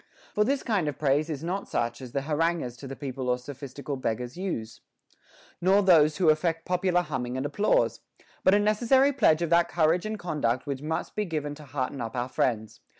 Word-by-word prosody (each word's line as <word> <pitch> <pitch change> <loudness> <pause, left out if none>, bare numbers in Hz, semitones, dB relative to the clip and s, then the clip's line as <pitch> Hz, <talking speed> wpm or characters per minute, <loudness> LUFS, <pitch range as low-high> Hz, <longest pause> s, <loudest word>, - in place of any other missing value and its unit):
* - - -26
For 210 - +3
this 275 +5 0
kind 200 -9 0
of 145 - -3
praise 150 +2 +1
is 150 -1 -4
not 185 +4 -3
such 120 +1 -2
as 125 -2 -8
the 140 +1 -2
haranguers 160 -3 0
to 135 - -9
the 135 - -6
people 130 -2 -4
or 125 - +2
sophistical 140 +2 -7
beggars 120 0 -3
use, 170 - -5 0.8
nor 195 +3 +4
those 155 -5 +5
who 175 -4 +4
affect 165 +1 -1
popular 180 0 +1
humming 130 -5 -3
and 130 - -2
applause; 200 +9 +1 0.4
but 190 - +5
a - - +4
necessary 240 +7 +3
pledge 160 - +3
of 170 - -2
that 170 0 +4
courage 170 +3 +2
and 215 0 -3
conduct 140 - -1
which 140 -2 -4
must 155 +2 -3
be 210 - 0
given 150 -4 -3
to 150 0 -12
hearten 130 -1 -3
up 115 0 -5
our 125 +1 -2
friends. 110 -4 -1
150 Hz, 210 wpm, -27 LUFS, 130-180 Hz, 0.8 s, those